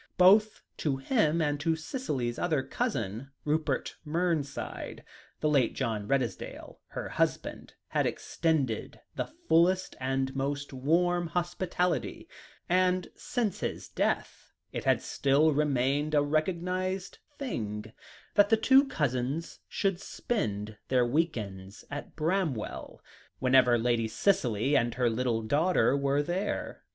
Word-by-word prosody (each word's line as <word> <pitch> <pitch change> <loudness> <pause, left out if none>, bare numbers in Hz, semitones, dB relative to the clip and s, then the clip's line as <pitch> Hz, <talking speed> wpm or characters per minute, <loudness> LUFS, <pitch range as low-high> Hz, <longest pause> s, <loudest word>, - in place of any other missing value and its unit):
Both 205 +4 +5
to 140 -4 0
him 165 - +2
and 145 -1 0
to 160 +2 +1
Cicely's 150 - -3
other 155 -6 +1
cousin, 130 - -3 0.2
Rupert 150 -2 -1
Mernside 160 -3 -2 0.4
the 155 - +2
late 140 -6 +2
John 105 -3 -2
Redesdale, 130 -2 -2
her - - -5
husband, - - -2
had - - +1
extended 145 -9 -1 0.2
the - - -2
fullest 185 - +2
and 135 0 -1
most 140 +1 -2
warm 175 +6 +2
hospitality; 175 +1 -1 0.4
and 185 0 +2
since 225 -6 -2
his - - -4
death, - - -2 0.2
it - - -5
had - - +3
still 140 +3 +3
remained 145 +1 +1
a 145 - +5
recognised 180 +5 -1 0.2
thing 110 - -4 0.4
that 205 -1 +5
the 225 - +5
two 270 +4 +5
cousins 140 - -2
should 195 -2 0
spend 105 - -3
their 125 -2 +3
weekends 110 - -2
at 145 - -6
Bramwell, 160 - -2 0.3
whenever 130 -2 +5
Lady 115 -1 +1
Cicely 130 - +1
and 120 -2 +2
her 125 -1 +2
little 115 -1 0
daughter 145 +1 +3
were 140 +1 +1
there. 180 +6 -3
145 Hz, 120 wpm, -29 LUFS, 125-180 Hz, 0.4 s, Both